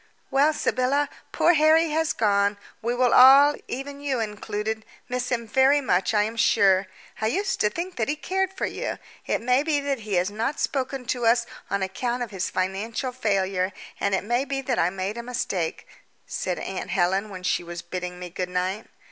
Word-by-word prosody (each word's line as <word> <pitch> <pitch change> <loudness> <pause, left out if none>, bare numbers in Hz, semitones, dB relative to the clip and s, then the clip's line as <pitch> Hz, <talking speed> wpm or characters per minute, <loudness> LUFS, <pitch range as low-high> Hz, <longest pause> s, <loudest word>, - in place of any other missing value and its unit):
"Well, 280 +3 +4
Sybylla, 280 -1 0 0.2
poor 345 - +4
Harry 315 +1 +4
has 320 0 +1
gone: 200 -1 +2 0.2
we 235 +2 -1
will 250 -1 +3
all 275 +3 +8
even 280 +2 -6
you 275 -3 -1
included 215 0 -3 0.2
miss 250 0 -2
him 235 -2 -2
very 265 +5 +4
much, 190 -9 +1
I 210 - +4
am 220 +2 -4
sure. 195 -3 +4 0.3
I 220 - +2
used 385 - -1
to 210 - +3
think 350 - -5
that 220 - 0
he 295 - +1
cared 380 +6 -1
for 385 - -3
you. - - -4 0.3
It - - 0
may 250 +3 +3
be 300 -1 +1
that 280 -2 -2
he 210 -3 -3
has 180 +3 +1
not 230 +7 -2
spoken 265 -1 -2
to 240 -1 0
us 235 +1 +4 0.2
on 200 -1 0
account 240 +6 -2
of 230 - -7
his 190 -3 -2
financial 205 +7 -2
failure, 195 -5 0 0.3
and 200 -1 +1
it - - -2
may 240 +5 +1
be 275 0 -3
that 255 -2 -1
I 170 - +3
made 195 +4 -4
a - - -3
mistake," 235 -9 -3 0.4
said 190 - -3
aunt 190 - -5
Helen 195 +2 +1
when 185 -2 -8
she 180 - 0
was 175 0 -7
bidding 180 -1 -5
me 180 -1 -8
good 180 0 -3
night. 185 +4 -2
230 Hz, 200 wpm, -25 LUFS, 195-270 Hz, 0.4 s, all